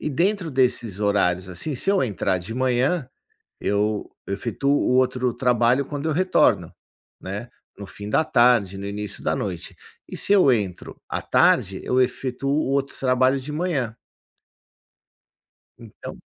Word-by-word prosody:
E 150 - -3
dentro 180 +4 0
desses 120 -6 0
horários, 95 -3 +1
assim, 95 - -4
se 195 +10 0
eu 200 - +2
entrar 100 -5 0
de 90 +5 -7
manhã, 130 +4 +1 0.5
eu 105 +1 -1 0.2
efetuo 120 +7 -2
o 145 -2 +2
outro 125 -1 +1
trabalho 125 +1 +2
quando 145 +2 -4
eu 155 - +1
retorno, 185 +4 +2 0.5
né, 105 +5 -6 0.3
no 100 - -7
fim 100 +2 -9
da 160 - +3
tarde, 120 -8 +3
no 100 - -6
início 100 -1 -5
da - - 0
noite. - - -5 0.3
E - - -7
se - - +1
eu 185 -10 +6
entro 100 -6 -3
à - - -3
tarde, 95 0 +2
eu 130 - +1
efetuo 130 +1 -1
o 145 0 +1
outro 140 0 -1
trabalho 130 +1 +2
de 150 +3 -7
manhã. 150 -9 -2 1.8
Então 115 -3 -10
125 Hz, 150 wpm, -23 LUFS, 105-140 Hz, 1.8 s, eu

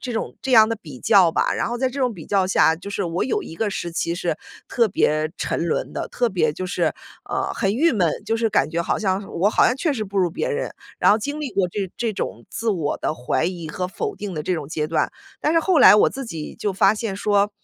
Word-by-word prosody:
这 250 - -5
种 225 - -4
这 265 - -2
样 220 -2 +7
的 230 - -1
比 150 - -11
较 195 -6 +5
吧。 - - +1
然 - - -1
后 240 - -2
在 260 +2 +1
这 275 - -7
种 250 -3 +1
比 165 -5 -10
较 195 -2 +1
下 175 -3 +4
就 180 - -9
是 200 0 -2
我 170 -1 -1
有 415 +10 -1
一 160 - -9
个 220 +4 0
时 175 -3 -4
期 170 0 -1
是 175 -3 -2 0.3
特 235 -2 +2
别 155 -5 +1
沉 170 - -2
沦 165 - -2
的， - - -3
特 245 - 0
别 170 -7 +1
就 185 - -5
是 185 - -1 0.4
呃， - - -1
很 195 +1 0
郁 320 +8 +3
闷， 185 -8 +2 0.2
就 225 - 0
是 225 0 +1
感 150 -8 +1
觉 170 - -1
好 170 - 0
像 190 -2 0 0.2
我 200 +3 +4
好 - - +4
像 245 - +1
确 305 +3 0
实 225 -6 -3
不 200 0 -8
如 180 -3 +2
别 205 - -2
人。 480 0 -2 0.3
然 - - +5
后 210 - +4
经 285 +7 -4
历 290 -4 -3
过 195 -4 +1
这 190 0 -4
这 230 -2 -1
种 - - -5
自 230 0 -2
我 165 -8 -1
的 - - -1
怀 125 -5 -1
疑 175 -3 -3
和 180 +4 -3
否 - - -4
定 205 -2 -6
的 155 -3 -4
这 185 - 0
种 150 -4 -5
阶 155 -1 -2
段， 160 - 0 0.3
但 305 - +1
是 330 - +4
后 330 -2 +3
来 - - +9
我 - - +5
自 270 0 -6
己 165 -9 -6
就 205 - -2
发 195 +2 +4
现 215 -2 -3
说 205 0 +2
200 Hz, 290 characters per minute, -22 LUFS, 170-230 Hz, 0.4 s, 来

